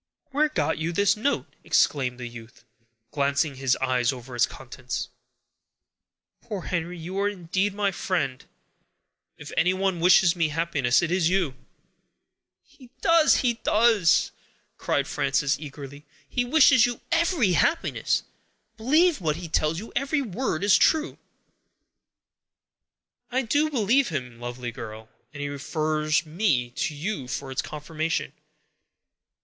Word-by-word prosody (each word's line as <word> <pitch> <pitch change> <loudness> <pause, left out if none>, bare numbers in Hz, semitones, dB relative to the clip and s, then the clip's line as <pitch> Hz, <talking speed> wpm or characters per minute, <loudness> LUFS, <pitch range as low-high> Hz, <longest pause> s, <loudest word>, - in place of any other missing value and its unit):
"Where 300 +3 +2
got 295 - -1
you 160 +2 -2
this 200 +3 +2
note?" 240 +7 -1 0.2
exclaimed 130 -3 +1
the 120 - -5
youth, 115 -1 -13 0.5
glancing 140 0 0
his 130 -1 +1
eyes 130 -1 +1
over 125 -1 -9
its 120 - +3
contents. 125 -1 -6 1.3
"Poor 200 -4 -6
Henry, 175 0 -3
you 180 +4 -5
are 200 +1 +2
indeed 190 +1 -2
my 200 -1 +1
friend! 155 -9 -2 0.9
If - - -10
anyone 185 0 +1
wishes 180 0 +5
me 165 -2 +1
happiness, 150 -4 +1
it 170 - -1
is 180 -2 +2
you!" 180 -7 +1 1.1
"He 255 -4 -19
does, 330 -2 +5
he 245 -2 +2
does," 215 -6 +3 0.5
cried - - 0
Frances, 140 +1 0
eagerly; 145 -1 -10 0.2
"he 245 - -1
wishes 255 -3 +5
you 240 -1 -5
every 335 - +2
happiness; 325 - +1 0.5
believe 300 - +3
what 155 -3 0
he 170 +1 -7
tells 155 0 0
you; 220 +6 -8
every 280 +1 0
word 200 -5 -3
is 200 -1 +5
true." 315 +1 +2 2.1
"I 260 +2 +1
do 290 +6 +1
believe 255 0 +2
him, 130 -6 -5
lovely 120 0 -5
girl, 110 -1 -9 0.2
and 145 -2 -8
he - - -2
refers 155 +2 -1
me 155 - 0
to 150 +4 -3
you 150 -3 -4
for 135 +1 -5
its 130 - -1
confirmation. 155 +2 -3
170 Hz, 135 wpm, -25 LUFS, 140-215 Hz, 2.1 s, wishes